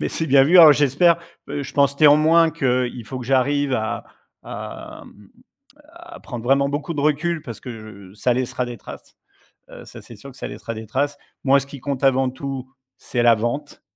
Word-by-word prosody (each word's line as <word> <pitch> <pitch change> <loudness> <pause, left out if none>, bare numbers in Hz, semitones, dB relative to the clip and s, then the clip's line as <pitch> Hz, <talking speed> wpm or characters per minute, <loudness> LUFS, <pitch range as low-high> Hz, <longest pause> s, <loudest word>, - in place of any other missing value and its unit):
mais - - -1
c'est 160 - -3
bien 135 -1 +5
vu. 175 +6 +4
Alors 155 -3 +10
j'espère, 150 +5 +3 0.3
heu, 145 0 -4
je - - -9
pense 140 0 +2
néanmoins 155 +2 +5
qu'il 125 -6 -1
faut 130 +4 -7
que 125 - -7
j'arrive 135 +1 +1
à 110 0 -3 0.4
à - - -9
mmh, 105 -1 -18 0.6
à 340 0 -13
prendre 120 -5 -8
vraiment 140 +2 +2
beaucoup 145 +3 -4
de - - -2
recul 155 +2 0
parce 115 -3 -8
que 125 - -10 0.4
je - - -18
ça 125 +3 +1
laissera 125 0 -2
des 120 -1 -8
traces, - - -12 0.5
heu, - - -12
ça, - - -12
c'est 115 - -13
sûr 135 +7 -12
que 130 - -18
ça - - -6
laissera 115 - -7
des 110 -1 -9
traces. 145 +5 -2 0.3
Moi, 140 0 +4
ce 135 - -7
qui 140 -1 -10
compte 140 -1 -4
avant 135 -1 +3
tout, 130 0 -6 0.3
c'est 120 - -3
la 120 -1 +6
vente, 120 +7 -4
135 Hz, 205 wpm, -21 LUFS, 125-145 Hz, 0.6 s, Alors